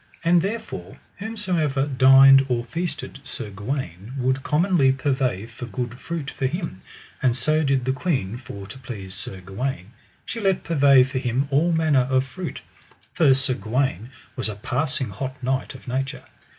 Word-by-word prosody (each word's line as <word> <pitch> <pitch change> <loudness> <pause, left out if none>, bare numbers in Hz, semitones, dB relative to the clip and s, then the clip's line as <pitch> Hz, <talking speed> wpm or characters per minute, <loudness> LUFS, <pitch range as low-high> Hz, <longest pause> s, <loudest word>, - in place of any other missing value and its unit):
And 170 +1 +5
therefore 220 +4 -5 0.2
whosomever 180 -11 -1
dined 135 0 +7
or 120 -1 +1
feasted 165 +3 -4
Sir 110 -6 -5
Gawaine 105 - -5
would 130 +1 +1
commonly 155 -2 +3
purvey 130 -6 0
for 120 +1 -9
good 120 +3 -4
fruit 165 -3 -4
for 135 - -1
him, 165 - -4 0.4
and 125 -2 +2
so 155 +3 +2
did 135 -3 +1
the 130 - +1
queen 130 - -1
for 100 -5 -9
to 130 - -10
please 105 -7 -7
Sir 95 -1 -6
Gawaine; 100 +2 -4 0.3
she 230 - -4
let 195 -3 +1
purvey 140 -5 +5
for 130 0 -2
him 130 +2 0
all 155 +5 +3
manner 155 -6 +3
of 130 0 +2
fruit, 175 +6 -6 0.5
for 155 -5 +5
Sir 130 -1 0
Gawaine 115 -1 -1 0.3
was - - -2
a 105 - -5
passing 130 +3 -2
hot 130 +7 -5
knight 130 +1 -1
of 130 - -13
nature. 135 +2 -3
130 Hz, 165 wpm, -23 LUFS, 120-150 Hz, 0.5 s, dined